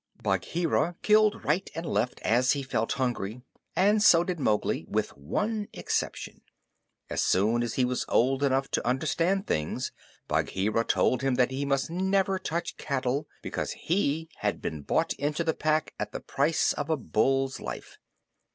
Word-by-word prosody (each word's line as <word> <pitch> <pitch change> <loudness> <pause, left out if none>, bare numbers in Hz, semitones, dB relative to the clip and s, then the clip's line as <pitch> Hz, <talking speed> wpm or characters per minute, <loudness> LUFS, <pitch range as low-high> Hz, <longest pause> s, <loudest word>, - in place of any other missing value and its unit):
Bagheera 170 0 0
killed 215 0 +4
right 165 +7 +1
and 165 +1 -4
left 115 -1 -1
as 125 +3 +3
he 140 -1 -3
felt 115 -4 -1
hungry, 125 -3 -2 0.3
and 205 +3 +4
so 170 -5 +7
did 175 -1 -3
Mowgli 105 -6 +1
with - - -1
one 210 - -2
exception. - - -3 0.7
As - - -1
soon 110 +5 +2
as 120 -2 -2
he 130 - +3
was 125 0 -1
old 130 +3 +3
enough 135 -1 +2
to - - -1
understand 170 - +1
things, 75 0 -2 0.4
Bagheera 105 +4 0
told 130 - +2
him 135 -2 +1
that 125 0 +2
he 135 +2 -2
must 140 +2 0
never 190 +1 +1
touch 170 -2 -3
cattle 140 +1 -1 0.2
because - - -3
he 160 -3 0
had - - -1
been 75 -2 -4
bought 160 - +1
into 150 +3 0
the 160 -1 +1
Pack 155 0 0
at - - -4
the - - -3
price 150 +3 +1
of 145 - -4
a 160 - +2
bull's 135 +2 +1
life. 65 -1 -7
140 Hz, 160 wpm, -28 LUFS, 125-170 Hz, 0.7 s, so